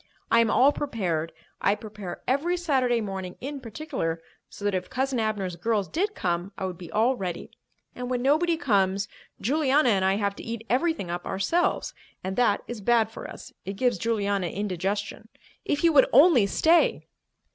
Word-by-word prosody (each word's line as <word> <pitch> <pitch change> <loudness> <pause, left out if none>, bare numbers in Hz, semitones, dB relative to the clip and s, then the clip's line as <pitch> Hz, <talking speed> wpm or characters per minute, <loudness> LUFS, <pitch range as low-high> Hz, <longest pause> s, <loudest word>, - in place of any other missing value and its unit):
I 230 - +6
am 230 -1 +4
all 270 +5 +5
prepared. 180 - -2 0.3
I 200 - +3
prepare 210 -5 -8
every 310 +8 +1
Saturday 260 -8 +1
morning, 190 -3 -5
in 280 +2 -5
particular, 225 - -4 0.3
so 205 - -9
that 205 - +1
if 185 -1 -2
Cousin 260 -1 -1
Abner's 205 -5 -1
girls 205 +2 0
did 405 +6 -1
come, 175 +2 -2
I 190 - -3
would 180 -2 -5
be 175 -3 -9
all 230 +5 +2
ready. 185 -6 -5 0.4
And 250 0 -5
when 250 -1 -1
nobody 325 +5 +3
comes, 195 - +1 0.3
Juliana 280 +3 +2
and 195 -4 +2
I 190 +1 +3
have 200 -1 -1
to - - -8
eat 230 -1 -5
everything 265 - 0
up 175 0 -4
ourselves. 265 - 0 0.3
And 190 +1 -3
that 240 -5 +2
is 240 -3 -6
bad 225 +1 +3
for - - -8
us—it 195 - -9
gives 240 -1 0
Juliana 200 -4 0
indigestion. 200 +3 -3 0.4
If 290 - -1
you 335 -1 +5
would 270 -3 +6
only 275 - +6
stay!" 325 - +3
220 Hz, 175 wpm, -26 LUFS, 190-265 Hz, 0.4 s, I